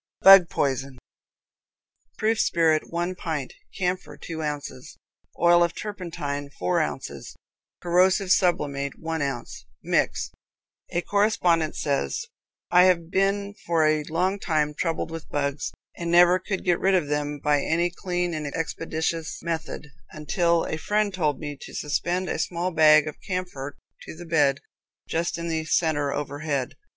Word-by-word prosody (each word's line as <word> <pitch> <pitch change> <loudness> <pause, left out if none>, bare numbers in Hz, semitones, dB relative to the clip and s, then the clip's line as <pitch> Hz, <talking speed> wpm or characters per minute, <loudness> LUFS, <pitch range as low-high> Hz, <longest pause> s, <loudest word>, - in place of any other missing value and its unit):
Bug 195 -3 +9
Poison. 135 -1 -1 1.2
Proof 220 0 +1
spirit, 160 -2 +2
one 175 +2 -1
pint; 160 -7 -4 0.2
camphor, 180 0 -2
two 160 -2 -6
ounces; 145 -4 -5 0.4
oil 175 +1 +5
of 170 -1 -1
turpentine, 165 -8 -5
four 90 0 +1
ounces; - - -5 0.5
corrosive 185 +2 +3
sublimate, 140 -8 +1
one 160 -1 -3
ounce. 120 - -4 0.2
Mix. - - 0 0.6
A 175 - -1
correspondent 180 -6 +2
says: 145 - -1 0.5
"I 180 +1 +7
have 170 -2 +2
been 200 +1 +1
for 165 -2 +3
a 155 0 +3
long 180 +5 0
time 155 -5 0
troubled 165 +1 -2
with 165 -1 -7
bugs, 140 0 -2 0.2
and 170 -1 -4
never 175 +1 +6
could 190 +1 -4
get 175 -2 +2
rid 195 0 +3
of 175 -6 +1
them 150 0 -2
by 145 0 +1
any 170 +3 +1
clean 175 -1 -2
and 155 -2 -3
expeditious 165 0 -3
method, 160 -2 -4 0.2
until 170 +2 +1
a 160 - -3
friend 210 +2 0
told 155 -6 0
me 145 -2 -5
to - - -10
suspend 175 +5 -1
a - - -2
small 175 +1 -1
bag 155 -2 +6
of 155 - -7
camphor 180 -7 -5 0.3
to - - -8
the 175 +2 -10
bed, 145 -4 +2 0.5
just 170 +1 -1
in 170 0 -4
the 160 -1 -1
center, 155 -3 +1
overhead. 145 -2 -3
165 Hz, 145 wpm, -25 LUFS, 150-180 Hz, 1.2 s, Bug